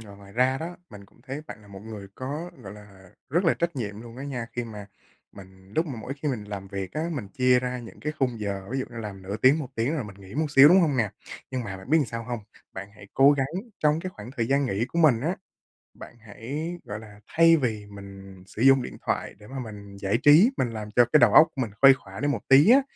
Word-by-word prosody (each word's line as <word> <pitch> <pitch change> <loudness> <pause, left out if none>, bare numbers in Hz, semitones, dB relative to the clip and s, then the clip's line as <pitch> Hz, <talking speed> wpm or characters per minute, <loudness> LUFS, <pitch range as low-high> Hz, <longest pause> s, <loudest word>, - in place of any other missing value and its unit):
rồi, 100 -2 -12
ngoài 100 0 -15
ra 130 +2 +2
đó, 170 +2 -6
mình 100 -2 -12
cũng 115 - -26
thấy 135 +3 -6
bạn 110 - -10
là 105 - -18
một 100 -1 -10
người 105 -3 -9
có, 150 +7 -5
gọi 100 -1 -9
là, 100 -3 -15 0.2
rất 170 +7 +1
là 165 - +4
trách 170 -2 -2
nhiệm 105 -4 -4
luôn 115 0 -11
á 135 - -7
nha, 125 -5 -4
khi 120 0 -3
mà 105 -3 -9 0.5
mình 95 0 -15
lúc 160 +1 +2
mà 130 -6 -6
mỗi 130 - -6
khi 150 - 0
mình 120 -7 -3
làm 100 -2 -7
việc 95 -2 -5
á, 160 +2 -2
mình 120 -10 -5
chia 125 +3 +3
ra 125 0 -3
những 120 -2 -11
cái 150 +1 -3
khung 125 -4 -1
giờ, 100 -2 -4
ví 135 - -2
dụ 130 - -2
như 120 - -11
làm 100 -3 -7
nửa 100 +3 -4
tiếng, 135 +7 +4
1 150 - -4
tiếng 120 +7 0
rồi 145 -7 -3
mình 100 -2 -11
nghỉ 100 +1 -13
một 155 +1 0
xíu, 140 0 +8
đúng 185 +4 +6
hông 150 -6 +1
nè? 110 -5 +1 0.4
Nhưng 130 -2 -3
mà 95 -3 -6
bạn 95 +7 -12
biết 160 - +5
sao 115 0 -5
làm 115 - -13
hông? 120 -1 -2 0.3
Bạn 95 +1 -7
hãy 100 -1 -14
cố 140 +2 +6
gắng 135 -2 0 0.3
trong 150 +1 +2
cái 185 +2 -5
khoảng 105 -3 -10
thời 115 -1 0
gian 140 0 +2
nghỉ 115 -1 -1
của 170 - -3
mình 140 -8 +5
á, 170 +7 -1 0.6
bạn - - -12
hãy, 140 +10 -6
gọi 105 +1 -6
là, 105 -2 -14
thay 165 0 +5
vì 110 -6 -2
mình 100 -2 -12
sử 110 - -8
dụng 135 0 +6
điện - - -7
thoại - - -2
để 105 - -14
mà 135 0 -6
mình 100 -4 -9
giải 100 +3 0
trí, 160 - +7
mình 125 - 0
làm 110 -2 -7
cho 120 - +6
cái 150 - +7
đầu - - +5
óc 160 - +8
của 135 - -2
mình 110 -5 -3
khuây 135 0 +9
khỏa 95 -7 -10
đi 145 - 0
một 145 - -1
tí 140 +8 +7
á, 265 +3 +7
120 Hz, 275 wpm, -26 LUFS, 100-140 Hz, 0.6 s, khuây